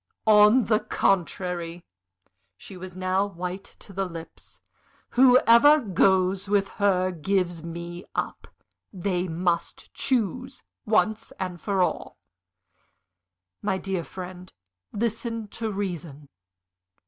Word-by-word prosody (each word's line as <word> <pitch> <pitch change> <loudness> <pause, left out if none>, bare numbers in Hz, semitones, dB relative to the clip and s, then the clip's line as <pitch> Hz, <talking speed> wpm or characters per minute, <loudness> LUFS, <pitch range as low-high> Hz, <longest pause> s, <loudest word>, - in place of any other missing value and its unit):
"On 215 +3 +6
the 215 -2 +3
contrary!" 175 -3 -1 0.7
She 195 - -11
was 185 0 -9
now 185 +1 +1
white 180 0 -6 0.2
to 200 - -13
the 195 +1 -1
lips. 165 -2 -11 0.5
"Whoever 255 +3 +6
goes 190 - +2
with 200 -1 +2
her 185 -2 +3
gives 175 0 -1
me 170 +1 -7
up. - - -3 0.4
They 185 -1 -2
must 170 0 -2
choose 255 +2 -2 0.2
once 220 +1 +1 0.3
for 195 -1 +1
all." - - -3 1.4
"My 190 - 0
dear 190 -2 -3
friend, 185 +1 -9 0.4
listen 230 +1 -3
to 225 +1 -4
reason." 170 -8 -5
190 Hz, 100 wpm, -25 LUFS, 180-210 Hz, 1.4 s, On